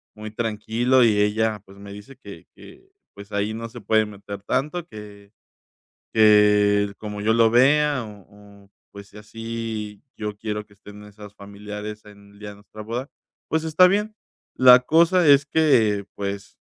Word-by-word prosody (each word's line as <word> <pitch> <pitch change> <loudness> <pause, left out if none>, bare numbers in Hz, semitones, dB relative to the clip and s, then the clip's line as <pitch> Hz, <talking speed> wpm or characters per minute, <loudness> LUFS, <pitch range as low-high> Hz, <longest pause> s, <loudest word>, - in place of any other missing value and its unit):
muy 110 0 -9
tranquilo 115 +3 0
y 105 -2 +2
ella 105 +1 0
pues 95 +1 -17
me 100 0 -11
dice 105 +7 -13
que - - -13
que, 385 - -17 0.2
pues, 100 +1 -13
ahí 100 +1 -2
no 115 +1 -7
se 120 +1 -11
puede 110 +1 +1
meter 100 -1 -10
tanto 150 +9 -3
que 105 -4 -13 0.8
que 105 -1 +4
como 105 -1 -7
yo 110 +2 +1
lo 115 -1 +4
vea, 140 +2 +3
o 100 -1 -16
o - - -41 0.3
pues 100 -1 -11
sí 105 - -16
así 110 -1 -7
yo 105 -1 -6
quiero 105 -1 -5
que 105 - -33
estén 105 +1 -15
nuestros 105 0 -14
familiares 105 +1 -9
en 100 -1 -17
el 100 - -20
día 105 0 -8
de 100 - -11
nuestra 105 +1 -13
boda, 120 +6 -6 0.4
pues 160 0 -1
está 160 +3 +5
bien. 210 +2 -2 0.4
La 125 -1 +7
cosa 165 +5 +2
es 140 0 +5
que, 110 -12 +2
pues 100 -1 -6
105 Hz, 170 wpm, -22 LUFS, 105-120 Hz, 0.8 s, La